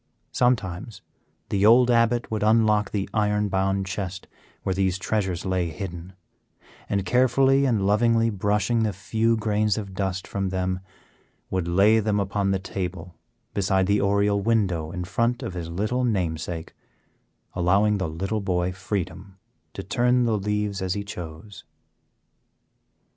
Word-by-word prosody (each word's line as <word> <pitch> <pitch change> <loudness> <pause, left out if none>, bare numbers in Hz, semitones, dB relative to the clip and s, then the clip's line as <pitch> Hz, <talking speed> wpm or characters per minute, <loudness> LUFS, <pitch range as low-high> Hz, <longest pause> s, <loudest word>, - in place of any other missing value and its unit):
Sometimes 110 -4 -1 0.5
the 100 -1 0
old 120 +3 +6
Abbot 115 0 +2
would 110 - -1
unlock 105 -1 +3
the 100 -2 -2
iron 105 -1 +1
bound 95 0 0
chest 95 -1 -5 0.4
where 95 - 0
these 95 -1 0
treasures 95 -3 -2
lay 95 -2 0
hidden, 85 +2 -7 0.8
and 100 -1 0
carefully 130 +5 +3
and 110 -7 +1
lovingly 115 +2 +3
brushing 105 +3 +1
the 110 -2 0
few 110 +4 0
grains 105 -1 +1
of 100 -3 -5
dust 95 -1 -2
from 95 -1 -2
them, 95 0 -1 0.7
would 95 -2 -1
lay 100 +6 +4
them 105 -1 0
upon 100 0 0
the 95 - +2
table 90 -2 -5 0.4
beside 95 -1 +1
the 100 +2 +2
oriel 100 0 +2
window 95 -8 0
in 90 -1 -4
front 115 +7 -1
of - - -4
his 85 -2 -5
little 110 +9 -1
namesake, 85 -7 -2 0.8
allowing 100 +4 +2
the 95 -4 -1
little 95 +7 -3
boy 90 -2 0
freedom 95 0 -5 0.4
to - - -6
turn 125 +6 +2
the 115 -2 +1
leaves 105 -1 -2
as 95 -1 -1
he 100 - -3
chose. 90 +1 -9
100 Hz, 140 wpm, -24 LUFS, 95-110 Hz, 0.8 s, old